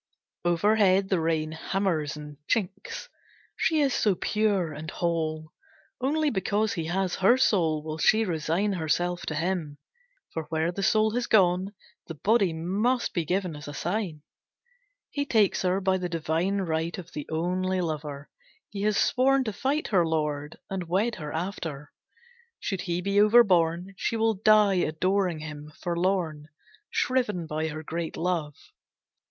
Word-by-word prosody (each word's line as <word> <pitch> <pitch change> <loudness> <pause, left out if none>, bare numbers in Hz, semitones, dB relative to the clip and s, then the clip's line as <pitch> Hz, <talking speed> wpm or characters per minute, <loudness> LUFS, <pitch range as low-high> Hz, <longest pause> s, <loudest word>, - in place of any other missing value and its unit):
Overhead, 190 +2 +3
the 190 - +2
rain 160 -1 0
hammers 160 -3 -1
and 150 -1 -9
chinks. 195 -4 -2 0.5
She 315 -2 +2
is 275 -3 +2
so 205 -3 +2
pure 200 -6 0
and 155 +2 -7
whole. 160 -1 -2 0.5
Only 300 +2 +2
because 205 +1 0
he 165 -3 -3
has 185 +2 -1
her 200 +7 +5
soul 165 -11 +2
will 155 0 -5
she 220 +5 +4
resign 175 +3 0
herself 175 +1 -1
to 155 - -2
him, 165 -3 -2 0.6
for 160 -1 -3
where 160 +2 -1
the 195 - -5
soul 215 +2 +3
has 240 +2 -1
gone, 190 0 +3 0.3
the 165 - -6
body 200 +2 +2
must 200 +10 0
be 170 -3 -1
given 180 -1 -1
as 150 -1 -9
a 145 - -7
sign. 175 -4 -3 0.9
He 285 - -1
takes 220 -8 +2
her 185 +1 +1
by 190 -1 +1
the 180 -1 -3
divine 170 +4 0
right 165 -1 -2
of 175 -3 -9
the 150 - -7
only 185 +3 0
lover. 150 -4 -4 0.4
He 200 - -5
has 210 0 +1
sworn 270 +1 +3
to 220 -4 -3
fight 280 +8 -1
her 185 -4 +4
lord, 150 -2 -2
and 185 -3 -4
wed 205 +7 +1
her 150 -1 -6
after. 160 -4 -5 0.7
Should 195 -3 -3
he 175 0 -2
be 200 +1 +3
overborne, 190 -5 +4
she 230 - -1
will 225 0 +2
die 210 -1 +4
adoring 180 +1 0
him, 150 -1 -8
forlorn, 170 -4 -1 0.4
shriven 225 -9 0
by 155 0 -2
her 155 0 -6
great 165 +1 -4
love. 165 -4 -1
180 Hz, 155 wpm, -27 LUFS, 160-205 Hz, 0.9 s, her